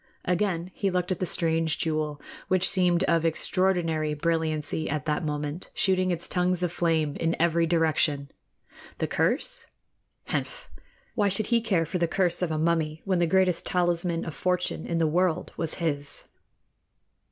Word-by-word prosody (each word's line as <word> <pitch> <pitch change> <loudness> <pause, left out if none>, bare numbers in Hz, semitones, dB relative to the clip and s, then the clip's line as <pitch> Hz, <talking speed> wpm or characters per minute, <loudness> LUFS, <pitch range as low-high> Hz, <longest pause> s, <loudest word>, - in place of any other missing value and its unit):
Again 180 -1 0
he 195 - -1
looked 180 0 -1
at 185 - -1
the 185 - 0
strange 165 -1 +1
jewel, 155 -2 -2 0.3
which 185 0 +2
seemed 180 -2 +2
of 170 -3 +2
extraordinary 165 -2 +1
brilliancy 160 0 -1
at 150 -2 -2
that 150 +2 -1
moment, 150 +2 -4
shooting 185 -1 +3
its 170 -1 -2
tongues 180 0 +1
of 175 - 0
flame 160 -4 0
in 165 0 -1
every 170 0 +2
direction. 155 -4 +1 0.7
The - - -1
curse? - - -1 0.6
Henf! - - -3 0.5
Why 205 -3 +2
should 195 +2 +2
he 235 - +4
care 190 -7 +1
for 180 +3 -3
the 170 - +2
curse 175 0 0
of 180 - 0
a 155 - -1
mummy, 160 -1 0
when 190 -3 +1
the 170 - +2
greatest 185 0 +3
talisman 175 -1 +1
of 165 - -5
fortune 180 +3 -1
in 170 - -1
the 165 - +2
world 170 +1 0
was 165 -1 -1
his? 145 -4 -2
170 Hz, 165 wpm, -27 LUFS, 160-180 Hz, 0.7 s, he